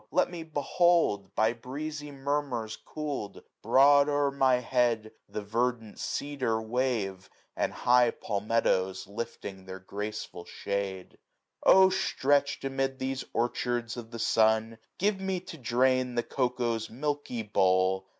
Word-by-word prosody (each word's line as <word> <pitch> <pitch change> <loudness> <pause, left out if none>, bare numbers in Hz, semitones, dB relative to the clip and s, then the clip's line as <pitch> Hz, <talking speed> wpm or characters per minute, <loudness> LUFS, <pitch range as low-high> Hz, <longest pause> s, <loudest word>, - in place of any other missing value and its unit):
Let 175 +4 +2
nie 175 -2 -6
behold, 160 - +1
by 110 +1 +3
breezy 145 +5 -6
murmurs 135 -5 -2
cool'd, 145 -9 -6 0.2
Broad 140 +2 +5
o*er 145 -1 +2
my 135 -2 +3
head 120 -3 +1 0.2
the 105 - -5
verdant 115 +1 -2
cedar 135 -6 -1
wave, 110 -5 -2 0.3
And - - 0
high 125 -1 +4
palmetos 100 -3 0
lift 115 +4 -6
their 95 -1 -7
graceful 100 -1 -6
shade. 100 -2 -4 0.4
Syj^ - - +6
O 190 0 +8
stretchM 145 -6 +1
amid 135 0 -1
these 130 0 -3
orchards 120 0 -1
of 120 -2 -8
the 115 - -7
sun. 110 0 +2 0.2
Give 200 0 +1
me 190 -1 -1
to 170 - -10
drain 125 +1 +2
the 120 - +1
cocoa's 120 -3 -1
milky 145 -2 -3
bowl. 95 -2 +2
120 Hz, 130 wpm, -29 LUFS, 110-140 Hz, 0.4 s, O